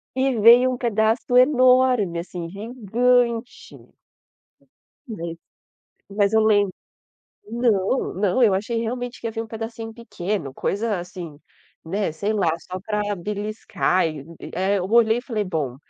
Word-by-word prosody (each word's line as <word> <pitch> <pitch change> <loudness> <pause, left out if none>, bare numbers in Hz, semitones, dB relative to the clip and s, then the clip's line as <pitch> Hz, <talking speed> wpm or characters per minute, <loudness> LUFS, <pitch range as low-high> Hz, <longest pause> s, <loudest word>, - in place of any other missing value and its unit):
E 265 -2 +1
veio 240 +4 +7
um 250 - -3
pedaço 225 +1 0
enorme 255 - +4
assim, 170 0 -6
gigante. 235 +3 -1 1.3
E 225 - -5
veio, 165 -2 -6 0.7
mas 200 +1 +1
eu 220 - +4
lembro, 205 -3 +3 0.8
não, 230 0 0
não, 200 +5 +1
eu 205 -5 +5
achei 225 +4 -2
realmente 245 +2 -4
que 230 - -5
ia - - -2
vir 225 0 -4
um - - -9
pedacinho 225 0 -6
pequeno, 200 - -4
coisa 210 -1 -1
assim, 175 -4 -8 0.5
né, 190 0 -2
sei 200 +7 -2
lá 195 -6 +1
só 185 +2 -7
para 210 0 -2
beliscar, 205 -2 -1
e 155 -3 -5 0.2
e - - -8
é, 190 +3 +1
eu 180 - -2
olhei 230 0 +4
e - - -6
falei 225 -5 -2
bom, 150 -9 -3
215 Hz, 145 wpm, -23 LUFS, 190-235 Hz, 1.3 s, veio